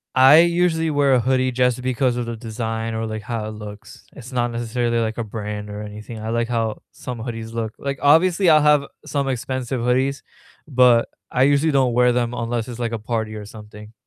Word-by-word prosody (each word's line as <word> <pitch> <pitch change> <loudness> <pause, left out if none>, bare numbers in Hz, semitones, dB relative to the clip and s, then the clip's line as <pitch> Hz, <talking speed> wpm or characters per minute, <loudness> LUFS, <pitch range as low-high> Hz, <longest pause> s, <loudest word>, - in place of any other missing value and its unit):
I 135 +5 +8
usually 170 -2 +1
wear 145 -2 +3
a - - +3
hoodie 130 +1 +1
just 125 0 +1
because 130 -1 0
of 120 -1 -3
the 115 - -4
design 115 0 -4
or, 110 0 -3
like, 110 -1 -5
how 110 0 -4
it - - -5
looks, 105 0 -11
it's 130 -2 -11
not 120 -1 0
necessarily, 120 0 -1
like, 110 0 -2
a 115 - -2
brand 105 -1 -6
or 105 +1 -6
anything, 105 +2 -8
I 110 +1 -5
like 115 0 0
how 115 -2 -2
some 125 -2 -7
hoodies 115 -1 -6
look, 110 -1 -3
like, 140 0 -3
obviously 170 +6 +4
I'll 155 -1 +6
have 150 -1 +4 0.2
some 140 -2 -1
expensive 130 -1 -3
hoodies, 130 +3 +1 0.5
but 125 -4 +4 0.2
I 125 - +2
usually 145 +3 +3
don't 130 -3 +2
wear 125 0 +4
them 120 0 -1
unless 115 -1 -2
it's, 120 -1 -7
like, 120 -1 -2
a 115 - -3
party 110 0 -3
or 105 -1 -7
something. 105 0 -12
120 Hz, 210 wpm, -21 LUFS, 110-130 Hz, 0.5 s, I